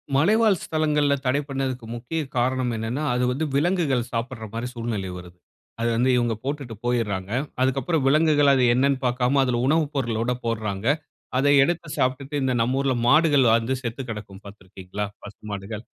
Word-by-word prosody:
மலைவாழ் 205 Hz, +6 st, +4 dB
ஸ்தலங்கள்ல 150 Hz, -2 st, +1 dB
தடை 130 Hz, +3 st, +2 dB
பண்ணுதுக்கு 130 Hz, -3 st, -3 dB
முக்கிய 130 Hz, +8 st, -3 dB, 0.2 s
காரணம் 125 Hz, 0 st, +1 dB
என்னனா, 115 Hz, +7 st, -3 dB
அது 125 Hz, +1 st, 0 dB
வந்து 145 Hz, +5 st, -1 dB
விலங்குகள் 145 Hz, -6 st, +1 dB
சாப்படுற 115 Hz, 0 st, -3 dB
மாரி 115 Hz, +2 st, -3 dB
சூழ்நிலை 115 Hz, -5 st, -3 dB
வருது. 90 Hz, 0 st, -12 dB, 0.4 s
அத 115 Hz, -, -1 dB
வந்து 125 Hz, +2 st, +2 dB
இவங்க 120 Hz, -1 st, +1 dB
போட்டுட்டு 140 Hz, -5 st, -4 dB
போய்றாங்க. 105 Hz, -5 st, -1 dB, 0.3 s
அதுக்குப்புறம் 135 Hz, +4 st, +1 dB
விலங்குகள் 145 Hz, 0 st, +4 dB
அது 130 Hz, -2 st, +3 dB
என்னனு 135 Hz, +2 st, +2 dB
பார்க்காம 125 Hz, +2 st, +1 dB
அதுல 120 Hz, -2 st, 0 dB
உணவு 155 Hz, +2 st, +3 dB
பொருளோட 120 Hz, -2 st, -1 dB
போடுறாங்க. 110 Hz, -3 st, -2 dB, 0.5 s
அதை 145 Hz, +2 st, +3 dB
எடுத்து 170 Hz, +1 st, -1 dB
சாப்ட்டுட்டு 130 Hz, +3 st, -1 dB
இந்த 130 Hz, -, +1 dB
நம்ம 125 Hz, +4 st, +1 dB
ஊருல 135 Hz, -2 st, +1 dB
மாடுகள் 145 Hz, -4 st, +5 dB
வந்து 115 Hz, +3 st, 0 dB
செத்து 120 Hz, +2 st, -4 dB
கெடக்கும் 105 Hz, -3 st, -8 dB
பார்த்திருக்கிறீர்களா? 100 Hz, 0 st, -7 dB, 0.2 s
பசு 105 Hz, -, -11 dB
மாடுகள். 100 Hz, +2 st, -6 dB
125 Hz, 155 wpm, -24 LUFS, 115-140 Hz, 0.5 s, மாடுகள்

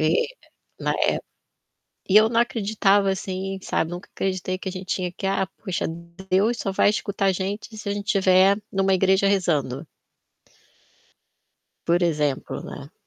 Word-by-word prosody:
É, 155 Hz, -, +3 dB, 0.7 s
na -, -, 0 dB
é. -, -, +2 dB, 1.0 s
E 190 Hz, -, +3 dB
eu 215 Hz, +1 st, +7 dB
não 230 Hz, 0 st, +2 dB
acreditava, 205 Hz, -4 st, +2 dB
assim, 190 Hz, 0 st, -3 dB
sabe. 165 Hz, -2 st, -1 dB
Nunca 175 Hz, +1 st, -7 dB
acreditei 185 Hz, -1 st, -2 dB
que 190 Hz, -, -5 dB
a -, -, -5 dB
gente 185 Hz, 0 st, -7 dB
tinha 180 Hz, -2 st, -3 dB
que: 195 Hz, +2 st, -4 dB
"Ah, 195 Hz, 0 st, +1 dB, 0.2 s
poxa, 190 Hz, -5 st, -2 dB, 0.4 s
Deus 210 Hz, +6 st, +3 dB
só 195 Hz, -, -2 dB
vai 195 Hz, -, +4 dB
escutar 205 Hz, -1 st, -1 dB
a 195 Hz, -, +5 dB
gente 200 Hz, +4 st, -4 dB
se 210 Hz, -1 st, -5 dB
a -, -, 0 dB
gente 205 Hz, 0 st, -5 dB
tiver 195 Hz, -1 st, +4 dB
numa 195 Hz, 0 st, +2 dB
igreja 190 Hz, +1 st, +3 dB
rezando". 155 Hz, -8 st, 0 dB, 2.0 s
Por 175 Hz, +1 st, +3 dB
exemplo, 150 Hz, -5 st, 0 dB
né. 140 Hz, +3 st, -9 dB
190 Hz, 155 wpm, -24 LUFS, 185-200 Hz, 2.0 s, eu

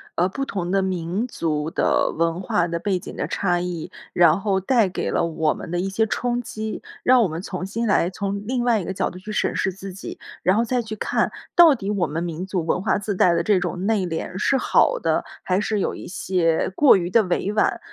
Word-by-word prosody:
呃， 175 Hz, -, +2 dB
不 230 Hz, +9 st, -4 dB
同 180 Hz, -8 st, -3 dB
的 195 Hz, 0 st, +2 dB
民 185 Hz, +3 st, -2 dB
族 155 Hz, -8 st, -2 dB
的 -, -, +1 dB
文 165 Hz, +2 st, -1 dB
化 175 Hz, -2 st, +1 dB
的 170 Hz, 0 st, -2 dB
背 190 Hz, +1 st, -1 dB
景 -, -, -9 dB
的 -, -, -2 dB
差 175 Hz, -3 st, 0 dB
异， 175 Hz, -3 st, -4 dB, 0.2 s
然 170 Hz, +1 st, +4 dB
后 195 Hz, -2 st, +1 dB
带 220 Hz, +1 st, +2 dB
给 185 Hz, -, -3 dB
了 -, -, +1 dB
我 160 Hz, -2 st, 0 dB
们 -, -, -8 dB
的 175 Hz, -, -1 dB
一 185 Hz, -, -1 dB
些 220 Hz, +3 st, +1 dB
冲 245 Hz, +2 st, -1 dB
击， 220 Hz, -2 st, -5 dB, 0.2 s
让 255 Hz, 0 st, +5 dB
我 195 Hz, -, +1 dB
们 160 Hz, +2 st, -5 dB
重 185 Hz, -1 st, -5 dB
新 230 Hz, +4 st, -2 dB
来 190 Hz, -4 st, +3 dB
从 200 Hz, +1 st, -4 dB
另 245 Hz, +2 st, -1 dB
外 230 Hz, -4 st, +3 dB
一 -, -, -5 dB
个 190 Hz, -, -4 dB
角 -, -, -1 dB
度 180 Hz, -, -11 dB
去 210 Hz, +3 st, -8 dB
审 210 Hz, -, 0 dB
视 190 Hz, -, 0 dB
自 195 Hz, +1 st, -9 dB
己， 195 Hz, -, -8 dB, 0.2 s
然 185 Hz, +3 st, +3 dB
后 230 Hz, -, +2 dB
再 245 Hz, +1 st, 0 dB
去 220 Hz, -1 st, -6 dB
看 -, -, 0 dB, 0.2 s
到 340 Hz, -3 st, +8 dB
底 205 Hz, -6 st, -4 dB
我 200 Hz, -5 st, 0 dB
们 155 Hz, +3 st, -3 dB
民 170 Hz, +1 st, -4 dB
族 185 Hz, -3 st, -2 dB
文 175 Hz, -, 0 dB
化 190 Hz, -1 st, +1 dB
自 205 Hz, 0 st, -3 dB
带 180 Hz, -1 st, +4 dB
的 170 Hz, -, +1 dB
这 200 Hz, +3 st, +3 dB
种 180 Hz, 0 st, -3 dB
内 210 Hz, -3 st, +1 dB
敛 175 Hz, +2 st, -4 dB
是 265 Hz, +7 st, +2 dB
好 -, -, +3 dB
的， -, -, 0 dB, 0.2 s
还 185 Hz, +2 st, 0 dB
是 210 Hz, 0 st, -1 dB
有 -, -, -1 dB
一 -, -, -9 dB
些 175 Hz, -3 st, 0 dB
过 285 Hz, -4 st, +6 dB
于 175 Hz, -2 st, -2 dB
地 230 Hz, +5 st, +5 dB
委 185 Hz, +2 st, -1 dB
婉。 215 Hz, -, +1 dB
190 Hz, 260 characters per minute, -23 LUFS, 175-215 Hz, 0.2 s, 到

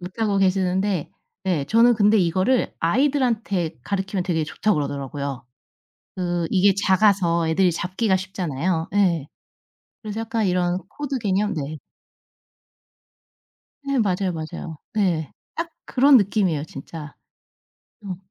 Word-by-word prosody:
못하고 200 Hz, +3 st, -1 dB
계시는데 190 Hz, -1 st, +1 dB, 0.3 s
네 170 Hz, -7 st, 0 dB
저는 230 Hz, +2 st, +5 dB
근데 210 Hz, 0 st, +4 dB
이거를 185 Hz, +8 st, +1 dB
아이들한테 225 Hz, -, +1 dB
가르키면 195 Hz, -1 st, -2 dB
되게 160 Hz, -4 st, 0 dB
좋다고 210 Hz, +7 st, 0 dB
그러더라고요. 140 Hz, -2 st, -4 dB, 0.7 s
그 175 Hz, -2 st, -1 dB
이게 195 Hz, 0 st, +4 dB
작아서 185 Hz, -4 st, +3 dB
애들이 180 Hz, +2 st, +3 dB
잡기가 190 Hz, +4 st, 0 dB
쉽잖아요. 180 Hz, -3 st, -2 dB
예. 175 Hz, -8 st, +2 dB, 0.8 s
그래서 215 Hz, +1 st, -4 dB
약간 225 Hz, -2 st, -1 dB
이런 180 Hz, 0 st, +1 dB
코드 280 Hz, -2 st, -4 dB
개념 205 Hz, -1 st, 0 dB
네. 155 Hz, 0 st, -4 dB, 2.1 s
네 275 Hz, -2 st, +1 dB
맞아요, 190 Hz, -3 st, +1 dB
맞아요. 160 Hz, 0 st, -6 dB, 0.2 s
네. 175 Hz, -8 st, 0 dB, 0.2 s
딱 335 Hz, +1 st, -3 dB, 0.2 s
그런 275 Hz, +2 st, +6 dB
느낌이에요 195 Hz, -, +1 dB
진짜. 150 Hz, +1 st, -9 dB, 0.9 s
어 185 Hz, -2 st, -4 dB
185 Hz, 270 characters per minute, -23 LUFS, 165-210 Hz, 2.1 s, 그런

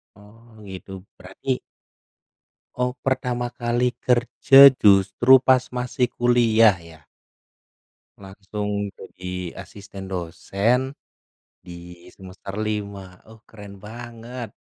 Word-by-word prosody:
Oh, 105 Hz, +3 st, -19 dB, 0.2 s
gitu. 95 Hz, 0 st, -10 dB, 0.3 s
Berarti 125 Hz, +8 st, -4 dB, 1.2 s
Oh, 125 Hz, 0 st, -1 dB
pertama 125 Hz, -2 st, -2 dB
kali 120 Hz, +1 st, -1 dB
kerja, 130 Hz, +3 st, +6 dB
justru 105 Hz, +2 st, +5 dB
pas 130 Hz, -1 st, +2 dB
masih 125 Hz, 0 st, -2 dB
kuliah, 115 Hz, -3 st, +3 dB
ya? 85 Hz, -3 st, -16 dB, 1.2 s
Langsung 100 Hz, +1 st, -5 dB
jadi 90 Hz, -2 st, -8 dB
asisten 100 Hz, -1 st, -11 dB
dosen 100 Hz, -, -2 dB, 0.7 s
di 90 Hz, -, -10 dB, 0.4 s
semester 95 Hz, 0 st, -11 dB
5. 100 Hz, -3 st, -5 dB
Oh, 110 Hz, 0 st, -17 dB
keren 100 Hz, -3 st, -13 dB
banget! 120 Hz, +1 st, -9 dB
110 Hz, 90 wpm, -22 LUFS, 95-125 Hz, 1.2 s, kerja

